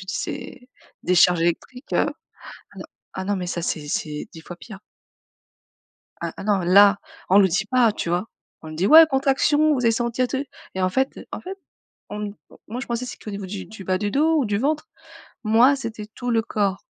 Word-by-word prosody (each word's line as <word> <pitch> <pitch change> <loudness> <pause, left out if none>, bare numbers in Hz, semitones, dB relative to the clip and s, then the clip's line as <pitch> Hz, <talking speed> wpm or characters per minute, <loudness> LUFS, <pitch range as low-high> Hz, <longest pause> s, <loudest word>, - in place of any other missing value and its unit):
dis, - - -4
c'est 255 -1 -6 0.4
décharges 180 -1 +4
électriques, 175 - -3
heu, - - +2 1.1
ah 190 - -4
non, 205 +1 0
mais 180 -1 -4
ça, 175 -1 -3
c'est 155 -3 -3
c'est 150 0 -3
10 160 - -11
fois 175 +2 -10
pire. 210 +1 -11 1.4
Ah - - -4
ah - - -8
non 205 -2 +2
là, 200 +3 +6 0.3
on 195 - +7
le 195 -2 +6
dit 195 +4 0
pas, 235 -1 +3
tu 170 - -4
vois? 175 +4 0 0.4
On 160 - -9
dit: 165 +5 -1
«Ouais, 320 +4 +9
contraction, 290 +2 +2
vous 265 - -1
allez 235 -2 +3
sentir 235 +2 0
et - - -18
tout». 270 +1 -2 0.3
Et 190 - -2
en 185 - +3
fait 265 +8 -1
en - - -5
fait, 385 +2 -8 0.5
on 210 -1 -5 0.3
moi 235 +4 -5
je 265 - -6
pensais 235 +1 -3
c'était 225 - -9
au - - -3
niveau 200 -1 -6
du 190 +1 -6
du 210 -3 -11
bas 185 0 0
du 205 +1 -2
dos 315 +6 +2
ou 290 - +2
du 205 -2 -1
ventre. 300 +5 -1 0.6
Moi 235 +6 +5
c'était 225 -5 -6
tout 245 +3 -6
le 225 -1 +2
corps. 200 -3 -1
215 Hz, 205 wpm, -23 LUFS, 190-255 Hz, 1.4 s, Ouais